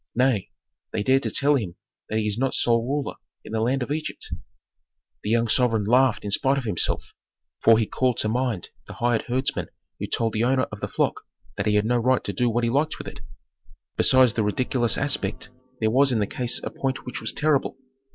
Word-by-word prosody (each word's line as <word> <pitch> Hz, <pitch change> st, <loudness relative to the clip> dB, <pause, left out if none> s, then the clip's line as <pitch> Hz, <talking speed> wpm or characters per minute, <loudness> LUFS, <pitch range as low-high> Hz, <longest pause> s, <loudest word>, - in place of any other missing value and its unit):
Nay! 125 Hz, -5 st, +1 dB, 0.4 s
they 105 Hz, -, -2 dB
dare 130 Hz, +4 st, +4 dB
to -, -, -1 dB
tell 145 Hz, +1 st, +3 dB
him 105 Hz, -11 st, -1 dB, 0.3 s
that 110 Hz, -, -1 dB
he 110 Hz, -, 0 dB
is 105 Hz, -1 st, 0 dB
not 130 Hz, +3 st, 0 dB
sole 115 Hz, -1 st, +3 dB
ruler 140 Hz, +3 st, -3 dB, 0.3 s
in -, -, -9 dB
the 110 Hz, 0 st, -1 dB
land 125 Hz, +3 st, +1 dB
of 135 Hz, -, -6 dB
Egypt. 155 Hz, +1 st, -4 dB, 0.9 s
The 105 Hz, -, -4 dB
young 115 Hz, +1 st, +2 dB
sovereign 115 Hz, -1 st, +2 dB
laughed 125 Hz, +2 st, +3 dB
in 100 Hz, -, -3 dB
spite 135 Hz, +6 st, +3 dB
of 135 Hz, -, -2 dB
himself, 105 Hz, -7 st, 0 dB, 0.5 s
for 115 Hz, -1 st, +6 dB
he 110 Hz, -, +2 dB
called 125 Hz, +2 st, 0 dB
to -, -, 0 dB
mind 120 Hz, -4 st, -1 dB, 0.2 s
the -, -, -8 dB
hired 120 Hz, +1 st, +1 dB
herdsmen 130 Hz, +2 st, -1 dB, 0.3 s
who -, -, -3 dB
told 115 Hz, -2 st, 0 dB
the 110 Hz, -, 0 dB
owner 130 Hz, +1 st, +2 dB
of 105 Hz, -, -7 dB
the -, -, -2 dB
flock -, -, -1 dB, 0.3 s
that 100 Hz, -, -2 dB
he 105 Hz, -, +2 dB
had 105 Hz, 0 st, +2 dB
no 120 Hz, +1 st, +2 dB
right 130 Hz, +2 st, +2 dB
to -, -, -3 dB
do 125 Hz, -1 st, +1 dB
what 120 Hz, +1 st, 0 dB
he 115 Hz, -, +2 dB
liked 150 Hz, +4 st, 0 dB
with -, -, -8 dB
it. -, -, -9 dB, 0.7 s
Besides 130 Hz, -3 st, +5 dB
the 110 Hz, -, 0 dB
ridiculous 120 Hz, +2 st, +1 dB
aspect 130 Hz, -5 st, -2 dB, 0.3 s
there 110 Hz, -1 st, +1 dB
was 135 Hz, +3 st, +4 dB
in 120 Hz, -, +1 dB
the 105 Hz, -, +1 dB
case 120 Hz, +4 st, -1 dB
a -, -, -4 dB
point 135 Hz, -1 st, -3 dB
which 125 Hz, 0 st, -5 dB
was -, -, 0 dB
terrible. 150 Hz, -3 st, 0 dB
120 Hz, 220 wpm, -24 LUFS, 110-130 Hz, 0.9 s, for